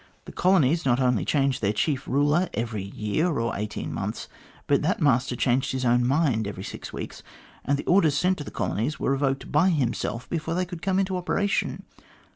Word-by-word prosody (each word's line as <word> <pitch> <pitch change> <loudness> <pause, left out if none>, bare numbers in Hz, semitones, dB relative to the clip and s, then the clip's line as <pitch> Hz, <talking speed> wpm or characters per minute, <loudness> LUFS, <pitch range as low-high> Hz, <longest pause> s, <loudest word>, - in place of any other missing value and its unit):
The - - -9
colonies 170 -4 +3
not 125 -2 +2
only 125 -4 +2
changed 135 -3 +1
their 100 -1 +2
chief 140 +4 -1
ruler 145 +6 +2
every 115 -2 -2
year 105 - -1
or 115 0 -1
eighteen 105 +1 -4
months, - - -4 0.4
but - - +2
that - - 0
master 125 -3 +2
changed 130 +2 +1
his 130 -1 -2
own 120 0 +3
mind 130 -7 +1
every 95 -2 -6
six - - -7
weeks, - - -7 0.4
and 140 +2 +1
the - - -6
orders 165 -6 +4
sent 180 +3 +1
to - - -4
the - - -8
colonies 120 +9 -2
were - - 0
revoked 135 0 -1
by 160 +6 +4
himself 120 - -1
before 165 0 -2
they 180 +1 0
could 175 -2 -8
come 190 -1 0
into 190 -1 0
operation. 200 +3 -1
140 Hz, 195 wpm, -25 LUFS, 120-165 Hz, 0.4 s, orders